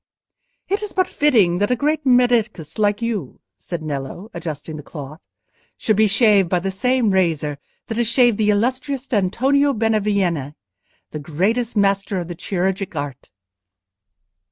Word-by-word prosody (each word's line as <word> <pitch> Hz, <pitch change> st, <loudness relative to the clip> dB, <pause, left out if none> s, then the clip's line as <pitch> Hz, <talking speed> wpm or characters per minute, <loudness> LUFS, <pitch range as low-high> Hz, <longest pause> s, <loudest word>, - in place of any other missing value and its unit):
"It 400 Hz, +2 st, -1 dB
is 420 Hz, -2 st, -5 dB
but 370 Hz, -1 st, +1 dB
fitting 215 Hz, -, +3 dB
that 205 Hz, -, +1 dB
a 250 Hz, -, +2 dB
great 300 Hz, +3 st, -1 dB
medicus 235 Hz, -, +2 dB
like 205 Hz, +1 st, +1 dB
you," 230 Hz, -4 st, -3 dB, 0.2 s
said 170 Hz, -3 st, -6 dB
Nello, 150 Hz, -, -5 dB
adjusting 160 Hz, -2 st, -6 dB
the 150 Hz, -, -7 dB
cloth, 150 Hz, +2 st, -9 dB, 0.6 s
"should 215 Hz, -, +1 dB
be 215 Hz, +1 st, +4 dB
shaved 200 Hz, -3 st, +4 dB
by 180 Hz, -, +2 dB
the 190 Hz, +2 st, -3 dB
same 250 Hz, +2 st, +1 dB
razor 160 Hz, -6 st, 0 dB, 0.3 s
that 225 Hz, -, -5 dB
has 240 Hz, -1 st, +1 dB
shaved 240 Hz, -2 st, +3 dB
the 210 Hz, -1 st, +2 dB
illustrious 255 Hz, +5 st, 0 dB
Antonio 265 Hz, +8 st, +2 dB
Benevieni, 200 Hz, -, 0 dB, 0.6 s
the 155 Hz, -, -5 dB
greatest 210 Hz, +11 st, -1 dB
master 195 Hz, 0 st, +1 dB
of 175 Hz, -2 st, -3 dB
the -, -, -4 dB
chirurgic 190 Hz, +1 st, -2 dB
art." 145 Hz, -3 st, -6 dB
205 Hz, 150 wpm, -20 LUFS, 175-240 Hz, 0.6 s, be